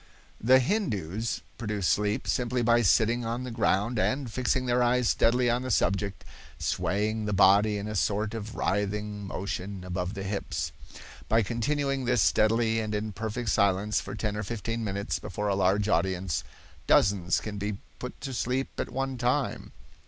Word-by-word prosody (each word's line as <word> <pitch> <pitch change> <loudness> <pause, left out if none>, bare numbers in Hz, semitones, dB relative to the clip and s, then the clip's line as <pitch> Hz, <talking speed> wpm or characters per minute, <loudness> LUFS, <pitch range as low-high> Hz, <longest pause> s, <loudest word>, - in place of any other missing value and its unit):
The 130 +3 +7
Hindoos 115 - -1 0.2
produce 105 -5 -1
sleep 105 +1 +1
simply 125 0 0
by 120 +1 +4
sitting 115 +3 +3
on 115 +2 -3
the 125 - -5
ground 110 0 +1
and, 130 +1 0
fixing 130 +2 0
their 125 0 +2
eyes 125 0 +3
steadily 120 +2 +3
on 120 +1 +2
the 130 - -4
subject, 100 -4 0 0.3
swaying 105 +2 -1
the 105 - -1
body 100 +2 +5
in 100 +1 -4
a 105 - -4
sort 105 +2 0
of 110 0 -6
writhing 105 0 -2
motion 95 0 -4
above 90 +2 -3
the 100 - -4
hips. 100 +1 -3 0.6
By 115 +1 +4
continuing 135 +4 -1
this 120 -2 +3
steadily 115 +1 +3
and 110 -1 -2
in 105 +1 -2
perfect 110 +4 -3
silence 100 +1 +2
for 95 - -7
ten 105 -1 -2
or 105 - -2
fifteen 115 +2 -3
minutes 100 0 -2
before 105 0 -3
a - - +2
large 100 +2 +2
audience, 95 -2 0 0.4
dozens 90 -4 +3
can 105 -2 -6
be 105 0 -3 0.2
put 125 - -7
to 135 -2 -5
sleep 125 +2 -1
at - - -2
one 135 0 -3
time. 125 +3 -1
110 Hz, 165 wpm, -28 LUFS, 100-120 Hz, 0.6 s, The